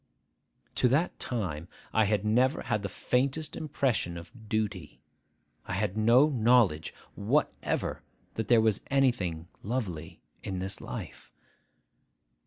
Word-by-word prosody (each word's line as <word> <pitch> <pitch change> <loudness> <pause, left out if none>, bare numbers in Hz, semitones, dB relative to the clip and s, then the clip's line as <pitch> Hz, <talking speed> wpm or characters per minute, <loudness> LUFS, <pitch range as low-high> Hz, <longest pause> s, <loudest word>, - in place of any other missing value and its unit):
To - - +6
that 145 +8 +1
time 90 -10 -3 0.3
I 110 - +4
had 105 0 +1
never 125 +7 +2
had 105 -4 0
the 100 - -3
faintest 135 +9 -1
impression 130 - -1
of 110 +6 -12
duty. 105 -7 -2 0.7
I - - -3
had 100 +1 0
had 100 - -9
no 120 +7 +5
knowledge 115 - +3 0.2
whatever - - 0 0.3
that 110 -1 -3
there 120 -2 +6
was 110 -2 +2
anything 110 - +1
lovely 90 -8 -4 0.2
in 95 - -4
this 95 +1 -3
life. - - -8
110 Hz, 125 wpm, -29 LUFS, 95-125 Hz, 0.7 s, To